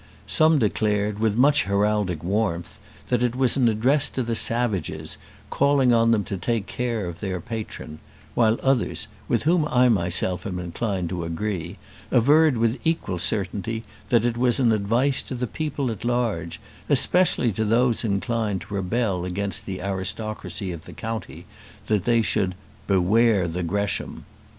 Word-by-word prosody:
Some 155 0 +4
declared, 105 -3 0
with 110 -1 +1
much 145 +3 +4
heraldic 100 -4 0
warmth, 90 -3 -2 0.3
that 125 -2 +1
it 125 -1 0
was 130 -1 +4
an 125 -4 +3
address 125 +7 +2
to 130 - -3
the 115 0 -2
savages, 115 -6 +1 0.3
calling 140 -3 +3
on 115 0 +3
them 110 -3 +2
to 100 - -5
take 110 +3 -1
care 120 -4 -3
of 85 -1 -7
their 95 -3 -3
patron; 110 -8 -7 0.3
while 115 -1 +3
others, 135 -3 0 0.2
with - - 0
whom 160 0 +2
I 125 -2 +3
myself 90 -2 0
am 90 -2 -4
inclined 90 +1 -3
to 90 -2 -4
agree, 85 +1 -4 0.3
averred 145 +3 +4
with 115 +2 0
equal 160 - -1
certainty 105 +5 -1 0.3
that 120 -2 +3
it 120 -1 0
was 125 0 +3
an 120 -3 +3
advice 115 +6 +1
to - - -6
the 125 0 -2
people 140 -1 -3
at 110 - -7
large, 115 -9 -1 0.3
especially 180 -9 +4
to 110 +3 -2
those 115 +2 +2
inclined 105 -1 -1
to - - -10
rebel 100 -1 -1
against 95 +2 -3
the 95 -2 -5
aristocracy 95 -1 -4
of 85 -2 -8
the - - -11
county, 110 -5 -6 0.4
that 105 -4 0
they 115 -1 +3
should 95 -4 0 0.3
"beware 100 +1 +3
the 85 +2 -3
Gresham." 100 +4 -3
110 Hz, 160 wpm, -24 LUFS, 95-120 Hz, 0.4 s, Some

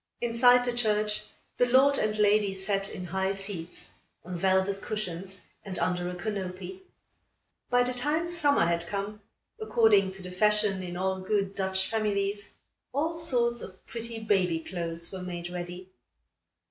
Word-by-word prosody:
Inside 245 +1 +5
the 245 - 0
church, 210 -3 +1 0.3
the 245 - +4
lord 270 +3 +5
and 215 0 0
lady 205 -1 +3
sat, 195 +1 -1
in 180 - -6
high 190 +2 -1
seats, 195 -4 -5 0.3
on 180 0 -5
velvet 190 +2 +1
cushions 190 -2 -4 0.2
and 190 -2 -6
under 180 -1 0
a 180 - -5
canopy. 195 - -5 0.9
By 245 0 +4
the 250 +1 -1
time 295 +7 0
summer 295 - +3
had 170 0 0
come, 205 +2 -4 0.4
according 220 - +4
to 190 0 -8
the 180 - -7
fashion 210 0 +3
in 175 -1 -5
all 190 +1 -1
good 195 0 0
Dutch 190 -1 0
families, 205 -2 -1 0.4
all 315 +5 0
sorts 240 -8 +1
of 185 0 -11
pretty 230 0 -6
baby 190 -6 +1
clothes 170 0 -3
were 190 -1 -6
made 175 -1 -5
ready. 180 +1 -7
195 Hz, 150 wpm, -28 LUFS, 185-225 Hz, 0.9 s, Inside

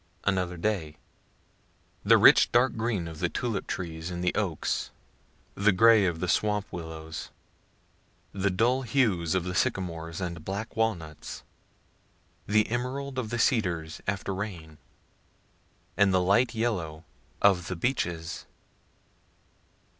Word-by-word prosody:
Another 90 -2 0
day 85 -5 -2 1.1
The - - +6
rich - - +7
dark 125 +2 +3
green 110 -6 -1
of 80 -2 -8
the 85 - 0
tulip 115 -2 -3
trees 80 -2 -4
and 90 0 -4
the 90 - +1
oaks, - - -1 0.6
the 105 +2 +3
gray 110 +1 +6
of 85 -2 -2
the 90 - -2
swamp 105 +2 +1
willows, 80 -2 -7 1.0
the 100 0 0
dull 120 +8 +2
hues 105 - +1
of 95 - +1
the 90 0 -4
sycamores 85 -6 -2
and 85 -4 -4
black 100 +5 -5
walnuts, 85 -9 -3 1.0
the 110 +1 +3
emerald 130 +3 -3
of 115 -4 -3
the 120 - -2
cedars 90 - 0
(after 100 0 -2
rain,) 85 -6 -6 1.2
and 100 +1 +4
the 95 - +3
light 100 +7 +2
yellow 90 -9 -2 0.4
of 90 -4 +3
the 95 - -3
beeches. 85 -6 -2
95 Hz, 125 wpm, -28 LUFS, 85-110 Hz, 1.2 s, rich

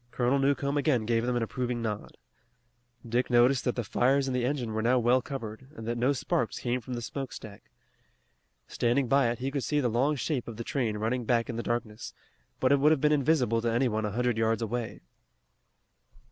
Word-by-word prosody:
Colonel 125 +3 +1
Newcomb 140 +1 +1
again 130 -6 +1
gave 115 +1 +1
them 125 - 0
an 120 - 0
approving 125 +1 -3
nod. 110 -3 -5 0.9
Dick 120 +2 0
noticed 120 +1 +4
that 125 - 0
the 120 - -2
fires 135 +5 +2
in 130 - -2
the 125 -1 0
engine 125 -4 -2
were 110 - -1
now 120 +3 +3
well 125 +2 +3
covered, 125 -2 -7
and 115 -5 -8
that 120 - -1
no 125 +3 +2
sparks 120 -3 -1
came 125 +1 -2
from 125 +2 -6
the 120 - -5
smoke 135 +4 -5
stack. 105 -3 -11 1.0
Standing 120 +2 +1
by 135 -1 +3
it 120 - -2
he 130 +2 -3
could 140 -2 -2
see 150 - 0
the 125 -4 +1
long 130 +7 +1
shape 140 -2 -2
of 115 -2 -7
the 115 - -4
train 115 -5 -1
running 115 +4 -1
back 115 +1 +1
in - - -6
the 115 - -2
darkness, 120 -2 -4 0.4
but 130 - +2
it 140 - +5
would 150 +3 +5
have 155 - +3
been 150 +2 +3
invisible 135 -6 +2
to 115 0 0
any 120 +3 +2
one 110 -1 -1
a 105 - -1
hundred 120 +1 0
yards 115 +1 +1
away. 115 +1 -4
120 Hz, 215 wpm, -28 LUFS, 115-135 Hz, 1.0 s, it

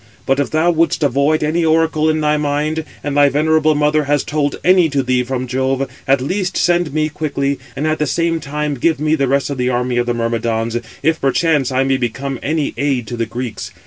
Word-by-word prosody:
But 135 +1 +1
if 140 - 0
thou 160 +3 +2
wouldst 165 -1 +1
avoid 140 +3 +2
any 160 +3 +1
oracle 160 -1 +2
in 155 0 0
thy 150 0 +2
mind, 150 +2 -1 0.2
and 145 -1 -3
thy 145 -1 +5
venerable 155 +2 +2
mother 150 0 +2
has 145 0 +1
told 145 -1 -1
any 180 -2 +4
to 140 -2 0
thee 125 0 +1
from 130 0 -3
Jove, 130 +1 -1 0.2
at 135 -1 +3
least 185 +6 -2
send 175 -3 +2
me 155 +1 0
quickly, 140 -2 -2 0.2
and 140 +3 -2
at 155 0 0
the 150 - 0
same 165 +3 0
time 150 0 -3
give 150 +3 0
me 155 +1 +1
the 140 -4 +1
rest 140 +2 0
of 135 - -4
the 125 0 +1
army 125 0 -1
of 120 0 0
the 120 - 0
Myrmidons, 115 0 -1 0.3
if 160 +1 +1
perchance 140 0 +1
I 130 +1 +2
may 135 0 +1
become 130 +2 -3
any 155 0 -1
aid 135 -3 0
to 120 - -4
the 115 -1 -2
Greeks. 110 -4 -5
145 Hz, 220 wpm, -17 LUFS, 130-155 Hz, 0.3 s, thy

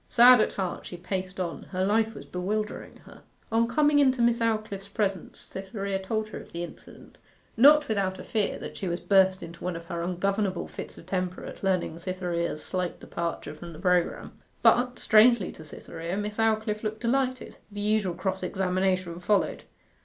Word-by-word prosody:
Sad 245 0 +8
at - - 0
heart 185 -3 -3
she 175 - -7
paced 185 +1 -4
on: 175 -2 -3
her 185 0 0
life 220 +2 +2
was - - -9
bewildering 210 +4 -4
her. - - -14 0.3
On 230 +1 +3
coming 295 +4 +3
into 260 -3 +4
Miss 235 0 +3
Aldclyffe's 215 -3 -1
presence 195 -4 -2
Cytherea 195 0 -4
told 215 +3 -2
her - - -6
of - - -13
the 170 +1 -4
incident, 175 - -12 0.4
not 295 +5 +7
without 195 -3 0
a - - -8
fear 215 -3 -1
that - - -8
she 190 - -3
would 175 0 -4
burst 190 -1 +4
into 170 0 -10
one 180 -1 -2
of 165 0 -7
her 170 0 -4
ungovernable 190 +2 -1
fits - - -8
of - - -12
temper 185 0 -3
at - - -9
learning 185 -4 0
Cytherea's 170 -3 -2
slight 180 -2 -2
departure 170 -3 -4
from 170 +2 -9
the 155 - -11
programme. 180 -2 +1 0.3
But, 245 0 +4
strangely 220 -2 +5
to 160 - -12
Cytherea, 165 +3 -6
Miss 210 +1 -3
Aldclyffe 220 -1 +1
looked 220 0 -3
delighted. 255 +1 -1
The 205 0 -5
usual 210 -4 +1
cross 190 +1 -2
examination 185 -1 0
followed. 200 +3 +1
195 Hz, 180 wpm, -27 LUFS, 180-220 Hz, 0.4 s, Sad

